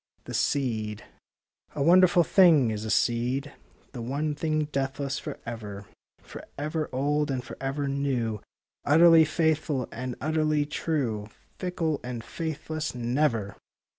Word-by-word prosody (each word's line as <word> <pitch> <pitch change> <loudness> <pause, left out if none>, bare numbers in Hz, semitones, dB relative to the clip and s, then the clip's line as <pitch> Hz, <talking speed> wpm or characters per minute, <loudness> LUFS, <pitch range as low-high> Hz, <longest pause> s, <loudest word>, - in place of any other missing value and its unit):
THE - - -8
SEED 110 -6 -1 0.7
A 140 - 0
wonderful 175 +1 +6
thing 160 - +5
is 105 0 -4
a - - -4
seed; 125 +6 0 0.4
The 125 - -7
one 145 +6 -2
thing 155 +1 0
deathless 135 0 -2
for - - -6
ever; 105 -4 -7 0.4
For - - -10
ever 155 +2 -2
old 145 +3 0
and 130 -2 -2
for - - -9
ever 140 +1 -2
new, 130 -6 -1 0.4
Utterly 165 +2 +7
faithful 155 -5 0
and 125 +1 -5
utterly 155 +1 +1
true 130 -9 -2
— - - -36
Fickle 170 -5 -1
and 120 -2 -5
faithless 155 -1 -4
never. 120 -4 0
140 Hz, 135 wpm, -27 LUFS, 120-155 Hz, 0.7 s, Utterly